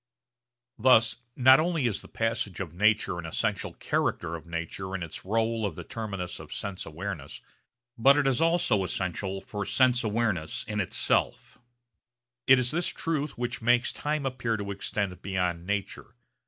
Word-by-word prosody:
Thus 115 -2 +5 0.2
not 130 +1 +7
only 165 -4 +1
is 110 -5 0
the - - -13
passage 115 -5 -2
of 85 -5 -5
nature 105 -1 +2
an 85 - -6
essential 80 - -1
character 85 -1 -1
of 85 0 -10
nature 85 +3 -4
in 90 - -3
its 85 - -6
rôle 115 +2 0
of 100 - -2
the - - -7
terminus 100 -6 -5
of - - -11
sense 100 -2 -4
awareness, 80 -3 -6 0.6
but 140 +5 +6
it 145 - +2
is 135 0 +2
also 165 - +3
essential 95 +2 -3
for 105 -1 -5
sense 125 +4 +3
awareness 105 -7 -1
in 105 -1 -4
itself. 95 - 0 0.9
It 130 - +8
is 125 -1 +1
this 175 +3 0
truth 150 -4 -2
which 120 0 -3
makes 120 +1 +3
time 150 -1 -2
appear 120 -4 -1
to 100 -1 -4
extend 100 -1 -3
beyond 90 -3 -2
nature. 100 -1 -3
105 Hz, 160 wpm, -28 LUFS, 95-125 Hz, 0.9 s, It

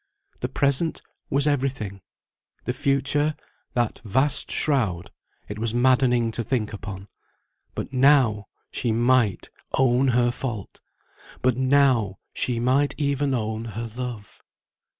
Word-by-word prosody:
The 125 - -3
present 140 +4 +2 0.3
was 140 +1 +1
everything; 135 -9 -1 0.6
the 125 - -2
future, 140 +3 +1 0.4
that 120 -2 0
vast 130 +7 +2
shroud, 110 - 0 0.4
it 105 +1 -6
was 115 +1 -1
maddening 125 -2 +3
to 115 - -3
think 115 -4 -2
upon; 100 -1 -7 0.7
but - - -5
now 130 -6 +4 0.2
she 120 - -1
might 120 -2 +2 0.3
own 130 0 +3
her 120 -1 +3
fault, 120 -5 -6 0.6
but 130 -1 +3
now 130 -6 +3 0.2
she 120 -2 -1
might 130 +4 +2
even 140 -2 0
own 110 -1 -3
her 115 0 -3
love. 120 -4 -7
125 Hz, 120 wpm, -24 LUFS, 110-135 Hz, 0.7 s, now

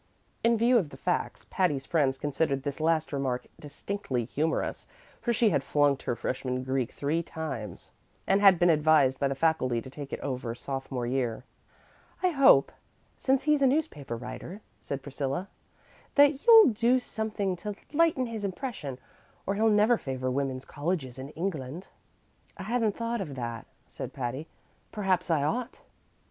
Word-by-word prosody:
In 230 0 +4
view 235 +2 +4
of 165 -8 -3
the 135 - -12
facts, 175 +6 -2
Patty's 150 -8 +1
friends 140 -5 +1
considered 140 -1 -1
this 145 +1 -4
last 160 -1 +1
remark 130 -3 -1
distinctly 145 - -4
humorous, 155 +7 -2 0.3
for 240 - 0
she 230 -2 +3
had 140 - +1
flunked 145 -1 +2
her 120 - -2
freshman 130 +1 -3
Greek 130 -1 -1
three 150 +4 -1
times, 155 - -6 0.3
and 195 +1 +3
had 195 -3 +7
been 175 0 +5
advised 150 -4 +4
by 140 - +2
the 135 - -2
faculty 135 -5 +1
to 130 +3 -9
take 140 0 -8
it - - -4
over 125 -4 -3
sophomore 135 -1 -4
year. 125 -2 -1 0.8
"I 365 - +5
hope, 275 - +5 0.5
since 265 0 +2
he's 300 -1 +3
a 270 - +6
newspaper 155 - -1
writer," 175 - -8 0.2
said 140 -1 -5
Priscilla, 140 +6 -3 0.7
"that 285 - +4
you'll 450 - +9
do 235 +3 +3
something 215 -5 -2
to 205 +3 -5 0.2
lighten 315 -4 +3
his 225 -3 -5
impression, 190 - -4 0.5
or 195 - 0
he'll 220 +2 +3
never 215 +3 +4
favor 130 -1 -3
women's 135 -1 -2
colleges 145 -5 -3
in 135 +1 -7
England." 165 -2 -4 0.7
"I 190 - -6
hadn't 225 0 0
thought 230 -1 -2
of 150 -8 -5
that," 115 -2 -5 0.2
said - - -7
Patty; 130 +4 -4 0.4
"perhaps 190 -4 0
I 155 -4 +2
ought." 240 - -2
155 Hz, 160 wpm, -28 LUFS, 135-210 Hz, 0.8 s, you'll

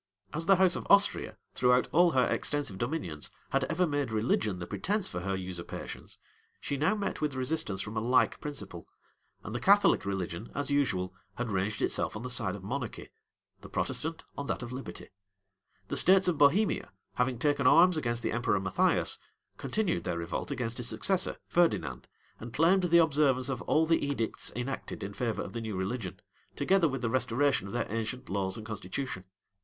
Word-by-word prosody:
As 165 +2 -2
the 195 - +7
house 185 -1 +4
of - - -5
Austria, 200 0 +4 0.2
throughout 125 0 +3
all 175 +2 +5
her 130 -2 +4
extensive 145 -10 -1
dominions, 120 - -3 0.2
had 135 -1 +2
ever 165 +6 +1
made 145 -4 -1
religion 110 -3 0
the 90 - -5
pretence 185 - -1
for 90 - -4
her 95 +2 -2
usurpations, 90 -2 -7 0.4
she 140 - -3
now 155 +9 +2
met 205 -6 -3
with 150 -3 -1
resistance 130 -7 -1
from 110 +2 -6
a - - +1
like 125 +3 +2
principle; 100 - -6 0.6
and 105 - -6
the 120 - -2
Catholic 200 - +5
religion, 95 0 -4
as 145 0 -2
usual, 95 -11 +1 0.2
had 120 -2 -3
ranged 100 +2 -1
itself - - 0
on 110 - -5
the 125 - -3
side 110 -6 +1
of 100 - -10
monarchy; 125 +3 -5 0.5
the - - -12
Protestant, 160 +1 -2
on 140 - -5
that - - -2
of 120 - -7
liberty. 130 +1 -7 0.8
The - - -1
states 190 +1 +6
of 180 - +2
Bohemia, 145 - +3 0.2
having 125 0 0
taken 140 +1 +2
arms 180 +4 +6
against 120 -6 -1
the - - 0
emperor 120 -4 +1
Matthias, 95 -1 +1 0.4
continued 195 - -1
their 85 -1 -2
revolt 85 0 -4
against 115 -2 -3
his 120 - -2
successor, 190 +7 0
Ferdinand, 95 - +1 0.3
and 115 +1 -8
claimed 170 +8 +4
the 170 -1 +4
observance 140 -5 +3
of 130 -3 -2
all 160 +1 +4
the 165 0 +2
edicts 140 -6 -2
enacted 125 -3 -4
in 100 +1 -5
favor 115 0 -2
of - - -8
the 115 - -4
new 110 -3 -4
religion, 95 0 -3 0.4
together 190 -3 +3
with 135 -2 -4
the 115 - +1
restoration 130 -2 +1
of 100 - -8
their - - 0
ancient 115 +3 -4
laws 95 -1 -1
and 110 - -8
constitution. 105 -1 -5
125 Hz, 185 wpm, -30 LUFS, 105-150 Hz, 0.8 s, the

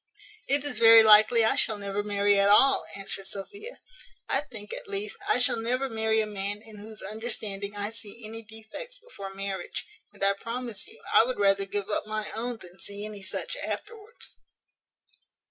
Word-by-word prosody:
"It 280 +1 +1
is 290 -6 -2
very 225 -1 +9
likely 220 +2 +7
I - - +3
shall 215 - +1
never 200 0 -3
marry 205 -1 +2
at 200 0 +4
all," 270 +6 +6
answered 195 0 -4
Sophia; 405 - -7 0.5
"I - - +1
think, 215 -8 -10
at - - -7
least, 200 +1 -2
I - - +5
shall 250 -1 +3
never 255 +4 -1
marry 220 0 +2
a - - -1
man 205 0 -3
in 220 -2 -12
whose 215 +1 -9
understanding 210 -1 -3
I 205 +1 -3
see 225 0 -8
any 225 +1 -7
defects 225 - -10
before 450 - -10
marriage; 195 -2 -4 0.3
and - - -8
I 200 0 +4
promise 230 0 -4
you 445 +2 -16
I - - +8
would 255 +2 -3
rather 195 -1 +3
give 205 +1 -2
up 210 - -1
my 215 0 -3
own 235 +2 -3
than 180 -3 -14
see 205 +3 -4
any 210 -2 -6
such 195 - -2
afterwards." 455 +1 -7
215 Hz, 180 wpm, -27 LUFS, 200-230 Hz, 0.5 s, very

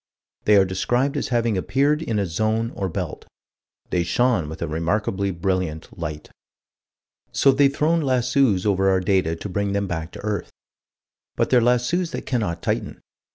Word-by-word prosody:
They 105 - +5
are 100 -1 +6
described 120 +9 0
as - - -1
having 115 -5 +1
appeared 145 +9 +1
in 115 -9 -2
a 100 - +1
zone 110 +6 -1
or 95 -1 -3
belt. - - -5 0.6
"They 90 - +2
shone 110 -4 +1
with 80 +1 -7
a - - -2
remarkably 95 +5 -1
brilliant 90 -3 -2
light." 75 -2 -6 1.0
So 135 - +4
they've 140 +1 +4
thrown 160 +4 +1
lassos 125 -6 +2
over 95 -1 +2
our 95 -1 +3
data 90 -3 +1
to 85 - -6
bring 100 +1 -1
them 100 0 0
back 85 -3 -4
to - - -9
earth. 105 -1 -2 0.9
But - - 0
they're 125 -2 +5
lassos 125 +9 +1
that - - -5
cannot 105 -10 -2
tighten. - - -2
100 Hz, 165 wpm, -23 LUFS, 90-125 Hz, 1.0 s, are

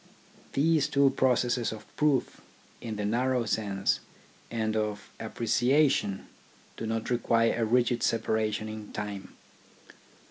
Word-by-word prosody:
These 155 +1 +3
two 140 -1 +4
processes 125 -2 +1
of 110 -1 -8
proof, 150 -4 +1 0.4
in 115 -2 -5
the 105 0 -3
narrow 125 +3 +1
sense, 100 -2 0 0.5
and 110 -2 -1
of 105 -1 -2
appreciation 120 -3 +1 0.5
do 115 - -5
not 115 +2 -2
require 115 -1 +2
a 115 -1 +1
rigid 120 +1 +2
separation 110 -1 0
in 110 -1 -8
time. 100 -2 -6
115 Hz, 115 wpm, -29 LUFS, 110-125 Hz, 0.5 s, two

